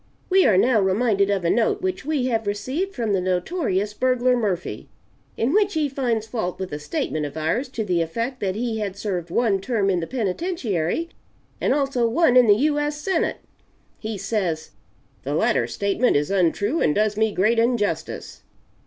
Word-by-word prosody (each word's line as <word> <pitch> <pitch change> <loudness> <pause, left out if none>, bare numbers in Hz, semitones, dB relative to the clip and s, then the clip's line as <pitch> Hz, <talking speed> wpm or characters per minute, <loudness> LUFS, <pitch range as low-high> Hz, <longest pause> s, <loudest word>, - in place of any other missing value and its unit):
We 380 0 +5
are 195 - +4
now 230 +1 +4
reminded 200 +1 +2
of 195 -3 0
a 170 - +3
note 235 +9 +1
which 375 -1 -2
we 295 -4 0
have 225 -4 -1
received 260 - -2
from 225 -4 -1
the 190 - +1
notorious 195 - -1
burglar 255 +1 +2
Murphy, 200 -7 -3 0.5
in 245 +6 +1
which 405 -2 +2
he 310 -2 +1
finds 245 -5 -1
fault 220 -6 -3
with 190 -4 -5
a 145 - -3
statement 150 +1 -3
of 145 - -10
ours 165 - -1
to 225 -4 -4
the 180 -3 +1
effect 230 +11 -3
that 190 -2 -1
he 225 0 -2
had 200 -2 -4
served 180 -5 -3
one 200 0 +1
term 200 -2 0
in 180 - +1
the 165 - -4
penitentiary 245 - -2 0.5
and - - +1
also 270 -4 +1
one 255 +1 +3
in 250 -2 +7
the 205 - +7
U. 295 -1 +2
S. 295 0 -2
Senate. 335 +2 -1 0.6
He 220 -1 -4
says, 190 -6 -2 0.5
'The - - -3
latter - - +2
statement 200 +5 +1
is 145 +5 -1
untrue 200 - +1
and 150 - +2
does 210 0 +1
me 220 0 +1
great 215 +5 +2
injustice.' 230 -3 -1
220 Hz, 185 wpm, -23 LUFS, 190-255 Hz, 0.6 s, in